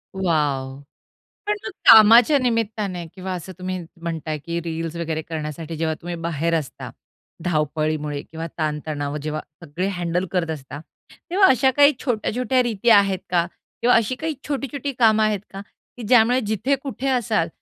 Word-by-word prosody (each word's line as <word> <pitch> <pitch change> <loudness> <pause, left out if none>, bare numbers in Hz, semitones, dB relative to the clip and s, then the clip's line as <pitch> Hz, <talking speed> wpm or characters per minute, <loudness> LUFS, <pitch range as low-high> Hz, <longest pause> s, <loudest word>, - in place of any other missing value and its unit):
Wow! 145 -7 -1 0.7
पण 420 - +2
मग - - -4 0.2
कामाच्या 225 +6 +8
निमित्ताने 215 -7 -1
किंवा 190 0 -6
असं 185 +1 -7
तुम्ही 185 0 -3 0.2
म्हणताय 160 -2 -3
की 170 +3 -4
रील्स 165 0 -4
वगैरे 165 -2 -3
करण्यासाठी 155 0 -6
जेव्हा 160 0 0
तुम्ही 175 0 -5
बाहेर 165 -1 -2
असता, 145 - -8 0.6
धावपळीमुळे 155 -2 -1
किंवा 160 +2 -7
ताणतणाव 150 -2 -3
जेव्हा 155 +1 -3 0.2
सगळे 170 +4 -3
हँडल 175 +1 -1
करत 180 -3 -1
असता. 145 -2 -7 0.5
तेव्हा 380 +2 +5
अशा 265 +1 +4
काही 290 +1 +7
छोट्या-छोट्या 250 +1 0
रीती 235 -1 0
आहेत 200 -4 +5
का? 175 -1 +2 0.4
किंवा 245 +1 +4
अशी 230 +2 +2
काही 315 +5 -3
छोटी-छोटी 280 -1 -3
कामं 220 -2 +5
आहेत 215 -2 +1
का? 195 - -6 0.4
की 245 - -7
ज्यामुळे 245 +1 +5
जिथे 220 +6 +1
कुठे 270 -1 -4
असाल 230 -9 +1
180 Hz, 150 wpm, -22 LUFS, 160-230 Hz, 0.7 s, कामाच्या